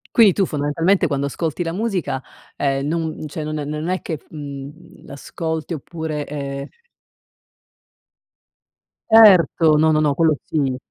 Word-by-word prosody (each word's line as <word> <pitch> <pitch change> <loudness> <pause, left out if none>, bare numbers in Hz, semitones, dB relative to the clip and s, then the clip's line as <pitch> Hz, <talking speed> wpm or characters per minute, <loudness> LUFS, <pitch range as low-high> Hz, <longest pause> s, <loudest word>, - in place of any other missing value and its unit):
Quindi 215 -5 +7
tu, 195 +1 +1
fondamentalmente, 160 +6 +1
quando 140 -1 -1
ascolti 160 +4 -3
la 165 - -3
musica, 180 - -2 0.4
ehm, 135 -1 0
non 160 0 -3
cioè 155 +1 -5
n 155 - -4
n 145 - -4
non 150 +2 -4
è 185 0 -1
che 160 -3 -4
f - - -25
mhmm, 145 +2 -10
l'ascolti, 160 +3 -5
oppure, 155 0 -5
ehm 140 -1 -5 2.4
Erto! 180 -8 +6
No, 160 0 +4
no, 155 - +2
no, 150 -2 +2
quello 160 +1 +2
sì. 135 -5 -1
155 Hz, 145 wpm, -20 LUFS, 145-170 Hz, 2.4 s, Quindi